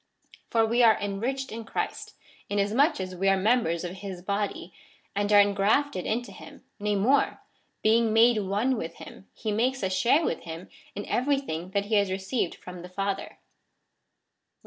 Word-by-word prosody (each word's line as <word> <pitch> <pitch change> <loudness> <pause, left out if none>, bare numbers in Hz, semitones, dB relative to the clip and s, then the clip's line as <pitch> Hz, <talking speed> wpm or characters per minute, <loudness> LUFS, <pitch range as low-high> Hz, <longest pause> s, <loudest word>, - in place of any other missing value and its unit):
For 225 -2 +3
we 235 +2 +2
are 225 -2 +6
enriched 240 +7 -3
in 225 +1 -6
Christ, 225 - -4 0.3
inasmuch 205 - +2
as 185 -1 -4
we 195 +2 +1
are 195 - +4
members 190 -5 +1
of 180 +1 -5
his 190 -3 -7
body, 200 -3 -3 0.4
and 205 +1 0
are 205 - +8
engrafted 200 +3 +2
into 240 +3 -2
him: - - -13 0.2
nay 210 0 0
more, 245 +8 +2 0.4
being 225 +1 +4
made 225 +1 +5
one 210 +6 0
with 165 -4 -5
him, 190 - -12
he 220 - -3
makes 250 +4 0
us 190 0 0
share 235 - +3
w^ith 235 - -1
him 165 +2 -8 0.3
in 205 - -5
every 275 +3 +1
thing 175 - -5
that 200 0 +1
he 215 +1 +2
has 200 -1 +2
received 190 +1 -2
from 180 -1 -10
the 180 - -10
Father. 195 +1 -3
205 Hz, 170 wpm, -27 LUFS, 190-235 Hz, 0.4 s, are